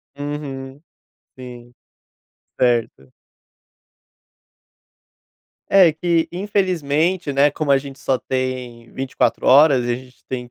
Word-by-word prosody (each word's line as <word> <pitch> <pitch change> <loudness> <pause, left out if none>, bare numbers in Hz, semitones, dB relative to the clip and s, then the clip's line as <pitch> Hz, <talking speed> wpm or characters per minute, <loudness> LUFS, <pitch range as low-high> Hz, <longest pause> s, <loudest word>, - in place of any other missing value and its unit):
Uhum. 145 -1 -7 0.6
Sim. 120 -1 -11 0.9
Certo. 115 - 0 2.6
É 190 -4 +6
que 165 +1 0
infelizmente, 180 -4 -1
né, 140 +2 +3
como 145 0 -1
a 140 - +5
gente 135 0 -9
só 130 - 0
tem 125 -3 -4
24 135 0 -1
horas, 140 -2 +6
e 120 - -1
a - - 0
gente 125 0 -14
tem 125 -2 -5
135 Hz, 105 wpm, -20 LUFS, 125-155 Hz, 2.6 s, É